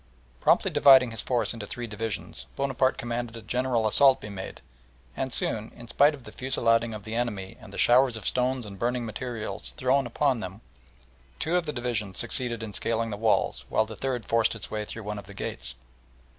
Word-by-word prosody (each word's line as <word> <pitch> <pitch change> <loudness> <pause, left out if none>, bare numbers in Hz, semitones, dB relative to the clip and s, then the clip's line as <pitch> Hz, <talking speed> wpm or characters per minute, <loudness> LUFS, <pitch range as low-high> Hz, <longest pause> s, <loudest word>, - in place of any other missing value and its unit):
Promptly - - +3
dividing 130 -3 +7
his 115 -2 -4
force 125 -2 0
into 110 -3 -7
three 120 - -5
divisions, 110 -1 -5
Bonaparte 135 -1 +1
commanded 120 -1 -4
a 115 - -10
general 125 +1 0
assault 135 +5 +5
to - - -10
be - - -6
made, 95 -1 -7 0.6
and 130 -1 -2
soon, 110 -2 0
in 120 -1 -11
spite 145 +5 +4
of 135 - -15
the - - -10
fusillading 115 -3 +1
of 105 - -8
the 110 - -6
enemy 110 -5 -2
and 110 -3 -12
the - - -9
showers 125 -1 +4
of 110 - -9
stones 125 -1 0
and 100 -2 -9
burning 120 +1 0
materials 110 -3 -4
thrown 130 0 +2
upon 130 +1 +1
them, 95 +1 -7 0.8
two 165 +3 -1
of 175 -3 +1
the - - 0
divisions 115 -7 -2
succeeded 120 -3 +1
in 105 -2 -6
scaling 115 +1 -1
the - - -2
walls, 105 - +1
while 110 - +2
the 110 0 -9
third 125 -2 -2
forced 115 0 +2
its 115 - -4
way 105 -1 -2
through 115 +1 -7
one 105 0 -4
of 100 - -12
the 100 - -11
gates. - - -4
115 Hz, 205 wpm, -27 LUFS, 105-125 Hz, 0.8 s, dividing